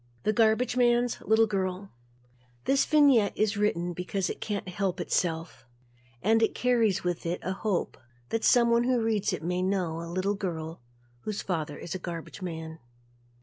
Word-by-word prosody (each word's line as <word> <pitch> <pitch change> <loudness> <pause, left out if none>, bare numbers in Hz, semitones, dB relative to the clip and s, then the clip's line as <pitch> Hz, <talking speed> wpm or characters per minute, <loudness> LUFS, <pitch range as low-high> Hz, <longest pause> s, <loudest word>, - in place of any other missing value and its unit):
The 215 - +2
Garbage 225 +3 +3
Man's 240 -1 +2
Little 220 +1 +4
Girl 195 -1 -3 0.7
This 275 0 +3
vignette 280 -9 +4
is 215 0 +1
written 180 -4 0
because 180 +2 -2
it - - -9
can't 205 -3 -3
help 185 0 -2
itself 165 -2 -1 0.6
and 225 +3 +4
carries 235 -6 +2
with 175 -1 -2
it 175 - -1
a 185 - -1
hope 195 -2 -2 0.3
that 225 - -1
someone 235 -1 +4
who 250 -1 +2
reads 220 -3 +1
it - - -4
may 180 +2 -1
know 185 -4 -1
a 170 - -7
little 185 +3 0
girl 165 - -5 0.4
whose 210 - -4
father 155 -5 -3
is 170 - -6
a 185 - -4
garbage 175 +1 -7
man. 160 -2 -6
195 Hz, 160 wpm, -28 LUFS, 175-225 Hz, 0.7 s, Little